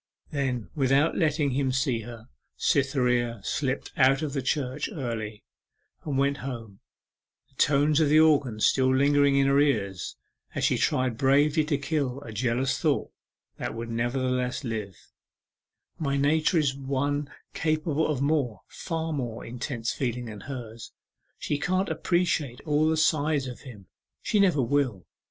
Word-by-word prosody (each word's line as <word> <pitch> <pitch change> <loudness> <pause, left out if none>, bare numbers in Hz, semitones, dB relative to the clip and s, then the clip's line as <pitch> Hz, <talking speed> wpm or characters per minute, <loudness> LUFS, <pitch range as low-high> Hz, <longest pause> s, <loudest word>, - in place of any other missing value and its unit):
Then, 130 -6 -2
without 140 +2 +2
letting 150 -3 +1
him 135 0 0
see 130 -2 0
her, 115 0 -10 0.3
Cytherea 125 -4 +1
slipt 135 +2 -2
out 135 +3 +4
of 150 - -2
church 130 +1 -1
early, 110 -6 -5 0.6
and 145 -4 -2
went 140 +1 +2
home, 115 -7 -7 0.7
the - - -32
tones 145 +1 +3
of 155 -3 +3
the 155 +1 +6
organ 145 -8 +3
still 130 +3 +3
lingering 140 +1 +4
in 140 0 +4
her 140 +1 +4
ears 100 -11 0 0.4
as - - -2
she - - +2
tried 130 -3 0
bravely 145 +3 +3
to 150 -2 0
kill 140 -3 -2
a 115 - -9
jealous 120 +4 0
thought - - 0 0.5
that - - -4
would 115 0 -5
nevertheless 125 +2 -1
live: 110 -6 -4 1.0
'My 140 -3 0
nature 155 +4 +2
is 145 -4 +2
one 140 +1 -2 0.2
capable 155 0 0
of 140 -3 -1
more, 140 -9 0
far 165 -2 -4
more, 120 -5 -4
intense 120 -1 -3
feeling 125 -2 -2
than 110 -2 -8
hers! 115 -4 -8 0.5
She 145 - -2
can't 185 +4 0
appreciate 165 -8 0
all 155 0 +2
the 160 - +1
sides 155 -2 +2
of 125 -2 -7
him 110 -8 -12 0.4
she 210 - +1
never 180 -9 +4
will! 125 -8 0
135 Hz, 145 wpm, -27 LUFS, 120-150 Hz, 1.0 s, the